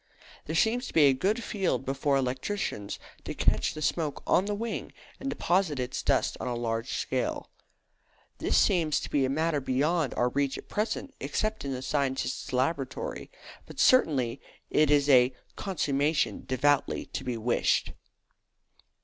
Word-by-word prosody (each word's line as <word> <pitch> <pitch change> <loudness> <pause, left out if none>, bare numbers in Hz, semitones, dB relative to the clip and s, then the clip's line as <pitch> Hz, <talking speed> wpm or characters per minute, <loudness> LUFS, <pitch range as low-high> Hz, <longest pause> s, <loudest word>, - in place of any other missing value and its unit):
There 160 - -4
seems 240 +8 +2
to - - -9
be 160 - +7
a 140 -2 +6
good 205 - 0
field 190 -9 -1
before 140 +1 +1
electricians 130 - -2 0.3
to - - -5
catch - - +1
the 155 - -4
smoke 150 -2 -1
on 185 - +3
the 205 0 -1
wing 230 +2 -4 0.3
and 275 - -3
deposit 180 - +1
its 125 -1 -3
dust - - +1
on - - -4
a 125 - -1
large 115 -1 -2
scale. - - -2 0.9
This - - +1
seems 165 -6 +3
to - - -7
be 140 -2 +2
a - - -1
matter 155 +1 0
beyond 145 +3 0
our 125 - +2
reach 140 +1 0
at - - -10
present, 220 +6 -2
except 215 0 -2
in 140 - -2
the 130 0 -4
scientist's 135 -2 -1
laboratory; 130 +1 -2 0.4
but - - -11
certainly 140 - +3 0.3
it 155 -1 +4
is 145 -1 +4
a 130 -2 +5 0.2
"consummation 150 -5 0
devoutly 140 +2 +1
to 130 - -6
be 125 -2 -3
wished." 120 +2 +1
145 Hz, 160 wpm, -28 LUFS, 130-175 Hz, 0.9 s, be